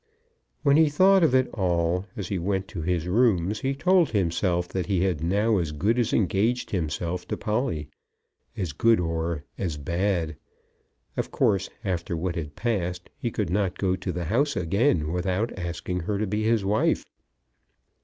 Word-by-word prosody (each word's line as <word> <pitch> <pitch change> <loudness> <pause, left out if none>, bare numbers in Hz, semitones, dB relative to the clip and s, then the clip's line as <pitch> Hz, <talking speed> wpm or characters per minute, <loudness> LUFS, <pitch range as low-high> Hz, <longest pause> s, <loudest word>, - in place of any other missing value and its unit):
When 140 -1 +5
he 160 -1 +5
thought 190 +6 +5
of 150 -5 +4
it 130 0 +4
all 90 -1 0
as 100 -4 -4
he 95 - -1
went 95 +2 -1
to 90 - -5
his 85 0 -1
rooms, 105 -2 +2
he 135 0 -1
told 180 +3 +3
himself 90 -2 0
that 95 -1 -3
he 95 -3 +1
had 90 -5 0
now 105 +5 +2
as 80 -4 -2
good 100 +11 +1
as 120 -1 +1
engaged 110 +4 +1
himself 85 0 -2
to - - -3
Polly; 105 - -1 0.7
as 90 -7 -2
good 115 +7 +4
or 80 -2 -2 0.2
as 85 -6 -2
bad. 85 +1 -1 0.8
Of - - -2
course, 95 -1 +1 0.2
after 85 -3 -2
what 85 +1 -2
had 75 -4 -5
passed, 90 -7 -2
he 135 -4 -3
could 105 -6 -2
not 95 -1 0
go 95 -2 +1
to 95 - -4
the 90 -1 -3
house 140 - +1
again 90 - +1
without 95 +6 -1
asking 90 0 -3
her 100 +4 -2
to 110 - 0
be 105 +2 -1
his 110 -3 +2
wife. 105 +3 +1
95 Hz, 175 wpm, -26 LUFS, 85-110 Hz, 0.8 s, When